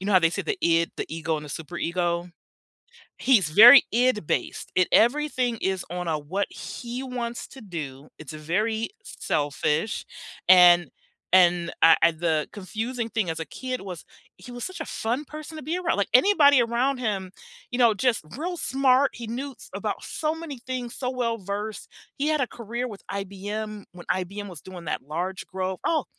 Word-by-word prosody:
you 195 - -5
know, 205 - +1
how 185 - +8
they 165 -2 +3
say - - -3
the 420 -3 -2
id, 165 0 +2
the - - -3
ego 160 0 -2
and 150 - -6
the - - -9
super 160 +4 -6
ego. 175 0 -1 0.9
He's 205 -12 +3
very 235 - +10
id 240 -6 +2
based. - - -2
It 185 -1 +3
everything 250 -1 +2
is 190 -1 -1
on 180 0 -4
a 155 -2 0
what 185 +8 -2
he 245 +1 -6
wants 245 -2 -4
to 270 - -13
do. 155 - -7
It's 155 -1 -9
a 155 - -8
very 215 +8 -1 0.2
selfish. 150 - -1 0.4
And 175 -1 +8 0.4
and 175 -2 +4
I, 165 0 +8
uh 170 - +6
the 160 -3 +1
confusing 225 +4 -4
thing 215 -7 -1
as 160 - -4
a - - -2
kid 255 +7 -5
was 185 -4 -8 0.3
he 245 - -12
was 245 - -7
such 370 -2 -6
a 320 - -2
fun 240 +6 -2
person 305 +2 -9
to 310 - -7
be 320 +6 -2
around. 360 -2 0
Like 200 - 0
anybody 285 -3 +6
around 245 +3 0
him, 195 -6 -2 0.4
you 245 - -3
know, 230 -3 +5
just 240 +2 +1 0.2
real 350 +2 -3
smart. 270 -1 +3
He 235 - -8
knew 260 +5 -5 0.2
about - - -3
so 310 0 -2
many 325 -5 -7
things 250 -2 -4
so 250 -2 -3
well-versed. 220 -4 -3 0.3
He 290 +2 0
had 310 -2 +1
a 255 - +1
career 235 +1 -5
with 205 -3 -10
IBM 205 +2 -5
when 175 -1 -12
IBM 195 +3 -2
was 175 -5 -9
doing 180 -1 -10
that 150 - -3
large 175 +6 -4
growth, 185 -1 -4
oh, 315 -4 +1
215 Hz, 190 wpm, -25 LUFS, 175-255 Hz, 0.9 s, very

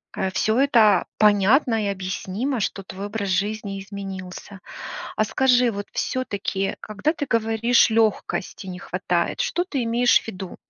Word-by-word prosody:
э, 190 - -1
всё 220 +6 +1
это 225 -8 +4
понятно 215 +3 +4
и - - 0
объяснимо, 195 +6 -3
что 195 0 -2
твой 195 +2 -7
образ 205 -2 -3
жизни 200 +1 -1
изменился. 195 -1 -8 0.6
А 215 - +2
скажи, 250 +1 +3
вот 200 0 -5
всё-таки, 200 -5 -2
когда 215 +9 -1
ты 290 -3 -4
говоришь: 230 +1 +3
"Лёгкости 215 -3 0
не 180 -1 -6
хватает", 180 -1 -1
что 350 +1 0
ты 280 -9 -2
имеешь 240 +2 +4
в - - -15
виду? 190 -3 -7
210 Hz, 145 wpm, -23 LUFS, 195-235 Hz, 0.6 s, это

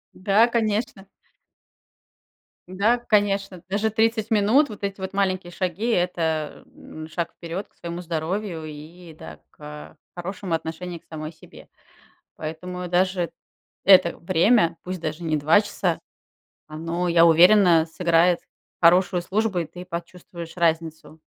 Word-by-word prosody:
Да, 200 +5 +3
конечно. 215 -4 -1 1.6
Да, 200 +6 +2
к 240 - -18
конечно, 200 -3 +1
даже 210 +3 0
30 220 0 0
минут, 225 +8 +4
вот 210 -2 -10
эти 195 0 -3
вот 190 0 -5
маленькие 190 -2 -1
шаги- 185 +4 -3
это, 165 -5 -1
э, - - -26
м, 155 0 -10
шаг 165 +1 -4
вперед 170 +4 -6
к - - -39
своему 170 +1 -6
здоровью 170 +1 -3
и, 160 +3 -11
да, 80 - -11
к, - - -32
а, 75 +1 -10 0.2
хорошему 180 0 -3
отношению 165 +2 -6
к - - -36
самой 155 -1 -7
себе. 160 - -16 0.7
Поэтому 180 +3 -6
даже 180 -1 0 0.5
это 185 -3 +6
время, 170 0 +2
пусть 185 0 -5
даже 160 +1 -4
не 155 -2 0
2 155 +8 +4
часа, 185 -5 -2 0.7
оно, 165 +3 -3
я 170 -1 +5
уверена, 170 0 +6
сыграет 170 +1 +2 0.4
хорошую 180 +1 +4
службу, 205 +1 -1
и 165 - -3
ты 175 +3 -10
почувствуешь 170 -1 -8
разницу. 160 -2 -1
175 Hz, 140 wpm, -23 LUFS, 165-195 Hz, 1.6 s, это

